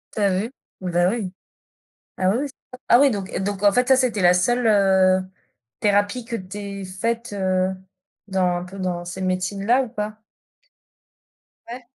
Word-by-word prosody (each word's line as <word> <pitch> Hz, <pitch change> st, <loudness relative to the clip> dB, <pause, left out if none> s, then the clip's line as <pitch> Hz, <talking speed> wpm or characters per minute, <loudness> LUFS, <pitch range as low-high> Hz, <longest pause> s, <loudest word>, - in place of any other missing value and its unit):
Tu -, -, -3 dB
as 190 Hz, -2 st, +2 dB
vu? 225 Hz, +5 st, -3 dB, 0.3 s
Bah, 175 Hz, -1 st, +2 dB
oui. 205 Hz, -4 st, -3 dB, 0.9 s
Ah 185 Hz, 0 st, +2 dB
oui, 205 Hz, -, +1 dB
c'est 275 Hz, -, -9 dB, 0.2 s
ça. 255 Hz, -, -10 dB
Ah 240 Hz, -, +7 dB
oui 280 Hz, -1 st, +6 dB
donc, 200 Hz, -4 st, -4 dB
heu, -, -, -1 dB
donc 200 Hz, 0 st, -3 dB
en 205 Hz, -1 st, +5 dB
fait 250 Hz, +4 st, +2 dB
ça 265 Hz, -, +6 dB
c'était 245 Hz, -6 st, +1 dB
la 175 Hz, 0 st, +6 dB
seule, 240 Hz, +7 st, +1 dB
heu, 190 Hz, -3 st, +4 dB, 0.6 s
thérapie 205 Hz, +3 st, +1 dB
que 230 Hz, 0 st, -4 dB
tu 190 Hz, 0 st, -8 dB
aies 200 Hz, -1 st, -6 dB
faite, 230 Hz, +5 st, -3 dB
heu, 185 Hz, -1 st, +1 dB, 0.6 s
dans 190 Hz, -1 st, 0 dB, 0.2 s
un 175 Hz, -, -6 dB
peu 190 Hz, +2 st, -10 dB
dans 180 Hz, -2 st, -2 dB
ces 175 Hz, +2 st, -6 dB
médecines-là 195 Hz, +6 st, +1 dB
ou -, -, -9 dB
pas? 215 Hz, -1 st, -5 dB, 1.5 s
Ouais. 250 Hz, +2 st, -7 dB
200 Hz, 180 wpm, -22 LUFS, 185-230 Hz, 1.5 s, Ah